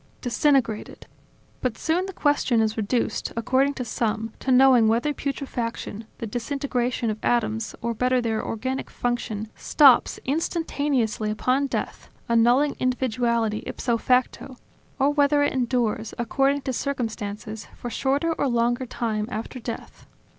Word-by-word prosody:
Disintegrated... 245 -2 0 0.6
But 250 -3 -1
soon 350 +4 0
the - - -5
question 290 -8 +2
is 220 0 +1
reduced, 225 +2 -1
according 265 +4 +2
to 250 - -4
some, 225 -1 -2
to 265 - -1
knowing 255 -3 +6
whether 235 +7 +2
putrefaction, 240 -6 -4
the - - -5
disintegration 245 0 -1
of 215 - -6
atoms, 225 -2 0
or 235 0 0
better 250 +3 +2
their 225 -2 -1
organic 260 +4 -3
function, 220 -3 -3
stops 275 -5 +5
instantaneously 280 -7 0
upon 255 +6 +1
death, - - -4 0.2
annulling 240 +5 +3
individuality 235 -3 0
ipso 240 -2 -1
facto, 255 +1 0 0.4
or 275 +2 +3
whether 290 0 +3
it 290 - +1
endures, 240 -4 -1
according 275 +4 +1
to 265 - -3
circumstances, 220 -5 -4
for 240 - -6
a - - -10
shorter 280 +8 +1
or 290 - 0
longer 240 +1 +1
time 220 -3 -2
after 230 +3 -5
death 230 -1 -8
245 Hz, 135 wpm, -24 LUFS, 225-270 Hz, 0.6 s, knowing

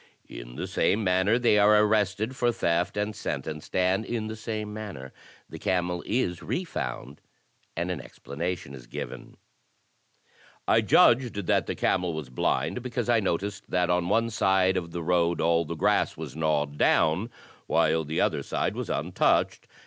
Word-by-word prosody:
In - - -9
the - - -4
same 110 +2 +1
manner 95 +4 +3
they 120 -4 +3
are 105 +1 +6
arrested 105 +2 +1
for 120 -1 +2
theft 85 -3 0
and 105 +1 -1
sentenced. 75 -1 -5
And 95 +3 +2
in 115 -1 -3
the 110 0 -5
same 110 -1 -5
manner 100 -12 -7 0.3
the - - -9
camel 90 -1 -1
is 100 -8 -1
refound 170 - -4 0.6
and 85 +2 -1
an 85 -6 -4
explanation 80 +1 -5
is 60 -3 -11
given: - - -8 1.3
*'I - - +4
judged 120 -1 +4
that - - +1
the - - -2
camel 90 -2 0
was 75 -5 -6
blind 75 - -1
because 120 -1 -3
I 120 -2 +4
noticed 100 +1 -3
that 90 -1 +1
on 90 0 +1
one 115 0 +2
side 95 -2 +2
of 85 -2 -2
the 85 0 -5
road 85 0 +1
all 85 0 +2
the 85 - -5
grass 100 +6 +1
was - - -7
gnawed 75 -2 -1
down, 85 +9 +3 0.4
while 80 0 +2
the 80 +2 -2
other - - +1
side - - -2
was - - -4
untouched. - - +1
90 Hz, 165 wpm, -27 LUFS, 80-110 Hz, 1.3 s, are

